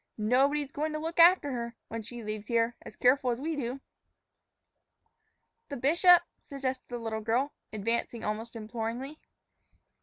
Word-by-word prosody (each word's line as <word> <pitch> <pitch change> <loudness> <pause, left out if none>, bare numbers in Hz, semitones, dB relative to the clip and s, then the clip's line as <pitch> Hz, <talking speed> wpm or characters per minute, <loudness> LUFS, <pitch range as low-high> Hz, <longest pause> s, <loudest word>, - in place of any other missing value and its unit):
Nobody's 270 +6 +2
goin' 310 0 -2
to - - -2
look 325 +2 -4
after 335 -4 +7
her, 235 -1 -4
when 230 0 -5
she 235 +2 -8
leaves 215 0 -5
here, 235 0 +1
as - - -11
careful 255 +1 +3
as 240 0 -1
we 315 +3 -2
do." 265 -1 -4 1.9
"The 280 - -4
bishop," 345 +7 +6 0.2
suggested 265 -2 -4
the 245 - -5
little 225 -2 -4
girl, 240 +6 0 0.2
advancing 230 +2 -2
almost 220 +3 -4
imploringly. 230 +6 -5
245 Hz, 145 wpm, -29 LUFS, 230-285 Hz, 1.9 s, after